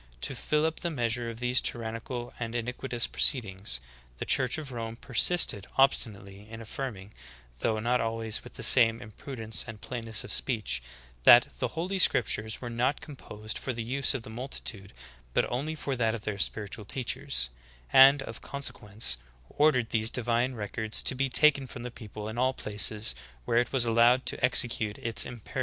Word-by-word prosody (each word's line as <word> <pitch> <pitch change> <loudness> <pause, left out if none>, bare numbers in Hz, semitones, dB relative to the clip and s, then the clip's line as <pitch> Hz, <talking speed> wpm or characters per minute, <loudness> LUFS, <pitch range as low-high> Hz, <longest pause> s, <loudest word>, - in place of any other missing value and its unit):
To - - 0
fill 150 0 0
up 160 0 -2
the 170 - -2
measure 120 -5 -1
of 115 0 -8
these 125 +1 +1
tyrannical 120 +1 -5
and 115 0 -4
iniquitious 120 +1 -3
proceedings, 95 - +2 0.4
the - - -5
church 130 0 +3
of 150 -4 -7
Rome 115 -2 -5
persisted 120 - +2
ob 135 +1 +7
stinately 100 -2 -4
in 115 0 -9
affirming, 110 -3 -7 0.5
though 110 - 0
not 120 +3 0
always 115 -1 -2
with - - -13
the - - -6
same 115 -3 +6
im 110 -3 -11
prudence 110 -2 -4
and 115 -2 -8
plainness 115 -2 -2
of 105 - -3
speech, 105 - +2 0.4
that 120 - +8
the - - -3
holy 185 +4 -2
scriptures 110 -10 +3
were 120 - -6
not 125 +4 0
composed 110 -7 -8
for 130 - -4
the 115 -1 -4
use 135 +4 0
of 125 - -4
the 110 - -10
multitude, 110 -4 -5 0.4
but - - +3
only 145 +6 -2
for 140 -3 -3
that 115 -2 0
of 110 - -8
their 105 -2 -4
spiritual 105 +2 -1
teachers; 65 - -1 0.4
and, 135 +1 +8
of 115 - -9
consequence, 105 - -1 0.3
ordered 140 -6 +2
these 110 0 +1
divine 120 +1 0
records 110 0 -1
to - - +1
be 135 +1 -1
taken 140 0 +4
from 120 -1 -9
the 125 - -6
people 105 -2 -9
in 110 +2 -5
all 130 +1 +2
places 105 - -1 0.3
where 115 - +2
it 120 - -1
was 130 -3 +2
allowed 120 +3 +4
to - - -2
execute 115 -4 +1
its 120 -3 +1
imperious 120 -4 -10
demands." 135 - -6
115 Hz, 185 wpm, -28 LUFS, 110-130 Hz, 0.5 s, that